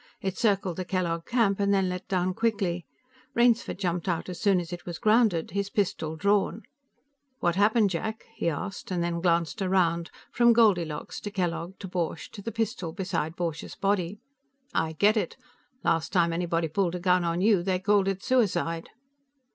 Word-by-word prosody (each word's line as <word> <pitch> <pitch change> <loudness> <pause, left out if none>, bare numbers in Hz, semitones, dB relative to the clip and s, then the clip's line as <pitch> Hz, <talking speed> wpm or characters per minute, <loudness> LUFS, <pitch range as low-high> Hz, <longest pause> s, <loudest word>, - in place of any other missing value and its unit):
It 190 -1 -3
circled 195 -5 +1
the 185 - -2
Kellogg 170 -2 -2
camp 225 -5 +2
and 200 0 +2
then 195 -2 +3
let 180 0 -4
down 185 -1 0
quickly; 195 -6 -1 0.5
Rainsford 235 -2 +3
jumped 180 -2 -2
out 175 0 -1
as 180 - -6
soon 200 -4 +4
as 175 0 -6
it 175 - -7
was 175 -2 -6
grounded, 215 -7 +3
his 200 +1 -2
pistol 170 -6 -1
drawn. 200 +5 +1 0.8
"What 175 -1 +1
happened, 205 +1 +3
Jack?" 220 +6 -3
he 170 - -1
asked, 185 +5 -5
then 170 -2 -1
glanced 170 +3 +1
around, 175 -3 +1 0.2
from 240 0 +5
Goldilocks 175 -10 +2
to 205 - -5
Kellogg 175 -2 -3
to 195 - -7
Borch 170 -3 -3
to 200 - -9
the 230 - -4
pistol 225 -7 -2
beside 170 -4 -2
Borch's 165 -3 -4
body. 195 -1 0 0.6
"I 160 0 0
get 205 +7 +3
it. - - -2 0.5
Last 165 -1 +1
time 170 -3 +3
anybody 170 -1 0
pulled 180 +2 0
a - - -3
gun 180 0 +3
on 170 0 0
you, 205 -2 +4
they 185 +1 0
called 200 +1 +2
it 195 -1 -2
suicide." 180 -10 +1
185 Hz, 175 wpm, -27 LUFS, 170-205 Hz, 0.8 s, from